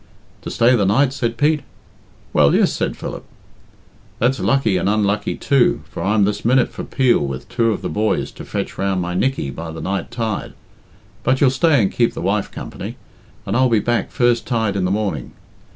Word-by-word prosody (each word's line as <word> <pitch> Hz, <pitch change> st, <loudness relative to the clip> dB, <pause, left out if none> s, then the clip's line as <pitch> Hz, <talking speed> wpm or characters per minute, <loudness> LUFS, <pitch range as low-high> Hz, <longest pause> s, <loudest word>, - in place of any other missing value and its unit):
"To -, -, -6 dB
stay 120 Hz, +2 st, +4 dB
the 105 Hz, -, +2 dB
night?" 130 Hz, +7 st, +3 dB
said 120 Hz, -4 st, -2 dB
Pete. 150 Hz, +4 st, +3 dB, 0.7 s
"Well, 70 Hz, -1 st, +4 dB
yes," -, -, +3 dB
said -, -, -2 dB
Philip. -, -, -6 dB, 0.9 s
"That's 125 Hz, +3 st, +1 dB
lucky 125 Hz, -8 st, +2 dB
and 95 Hz, -, 0 dB
unlucky 105 Hz, -1 st, 0 dB
too, 135 Hz, -3 st, +2 dB
for -, -, -6 dB
I'm 105 Hz, +1 st, +2 dB
this 105 Hz, 0 st, -2 dB
minute 125 Hz, +2 st, +3 dB
for -, -, -7 dB
Peel 130 Hz, -3 st, +2 dB
with 70 Hz, -2 st, -4 dB
two 115 Hz, -2 st, +1 dB
of 105 Hz, -, -4 dB
the -, -, -1 dB
boys 110 Hz, +1 st, -1 dB
to -, -, -10 dB
fetch -, -, -4 dB
round 95 Hz, -1 st, 0 dB
my 90 Hz, 0 st, -2 dB
Nickey 125 Hz, -, 0 dB
by 80 Hz, +3 st, -7 dB
the 80 Hz, 0 st, -7 dB
night 95 Hz, 0 st, -3 dB
tide. 115 Hz, -3 st, -3 dB, 0.7 s
But 130 Hz, +1 st, +1 dB
youll 135 Hz, -3 st, +4 dB
stay 150 Hz, +1 st, +3 dB
and 95 Hz, -, 0 dB
keep 120 Hz, -1 st, +1 dB
the -, -, -5 dB
wife 100 Hz, +3 st, 0 dB
company, -, -, -7 dB, 0.5 s
and 100 Hz, -, -2 dB
I'll 130 Hz, +1 st, +4 dB
be 115 Hz, -2 st, +3 dB
back 120 Hz, +3 st, 0 dB
first 120 Hz, -1 st, +1 dB
tide 110 Hz, -5 st, 0 dB
in 95 Hz, -2 st, 0 dB
the -, -, 0 dB
morning. 95 Hz, -, -2 dB
110 Hz, 200 wpm, -20 LUFS, 100-125 Hz, 0.9 s, stay